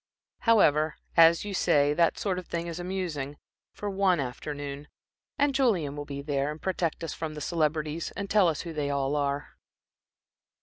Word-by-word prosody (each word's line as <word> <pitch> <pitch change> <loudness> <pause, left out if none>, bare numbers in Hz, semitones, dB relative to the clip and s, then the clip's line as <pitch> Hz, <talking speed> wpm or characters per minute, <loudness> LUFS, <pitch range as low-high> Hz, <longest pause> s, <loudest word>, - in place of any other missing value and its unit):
However, 155 -8 +4 0.2
as 165 +2 +6
you 205 - -4
say, 145 -6 +3
that 170 +2 +2
sort 190 -3 -1
of 180 - -10
thing 170 0 -3
is 170 0 -5
amusing 175 -6 -3 0.3
for 205 - -6
one 190 -3 +2
afternoon; 140 +2 -5 0.5
and 285 -1 +2
Julian 200 - +1
will 145 0 -5
be 140 -1 -6
there, 140 -1 0
and 150 +1 -6
protect 170 -1 -2
us 165 - -3
from 155 -1 -5
the - - -5
celebrities 155 0 -1
and 200 0 -3
tell 200 -2 +4
us 155 -3 0
who 170 -2 -6
they 150 -2 -2
all 140 0 0
are." 140 0 -1
155 Hz, 175 wpm, -28 LUFS, 145-180 Hz, 0.5 s, as